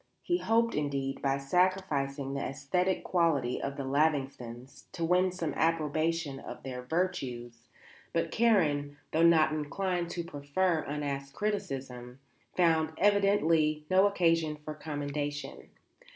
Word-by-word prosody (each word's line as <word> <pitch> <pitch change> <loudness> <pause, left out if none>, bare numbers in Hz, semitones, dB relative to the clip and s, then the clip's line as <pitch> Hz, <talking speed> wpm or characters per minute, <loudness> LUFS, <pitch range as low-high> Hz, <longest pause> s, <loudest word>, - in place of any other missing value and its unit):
He 350 0 +1
hoped 230 -2 +2
indeed, 140 -2 -2
by 135 0 +1
sacrificing 140 -3 0
the 140 - -2
æsthetic 180 +8 -1
quality 160 -9 +1
of 140 +1 -4
the 140 - -3
Lavingtons, 135 -3 -1
to 170 - -2
win 180 +2 +3
some 170 -4 -3
approbation 160 -2 0
of - - -9
their 125 -2 -5
virtues; 125 -7 -3 0.4
but - - -1
Karen, 150 -11 +2
though 160 - +1
not 165 -2 +5
inclined 175 +3 -2
to 170 - -3
proffer 165 +3 0
unasked 140 -1 -4
criticism, 135 -12 -4 0.4
found, 160 -3 +3
evidently, 165 -7 +3
no 190 +2 +6
occasion 165 -5 +2
for 150 0 -7
commendation. 145 -1 -5
155 Hz, 125 wpm, -30 LUFS, 140-180 Hz, 0.4 s, no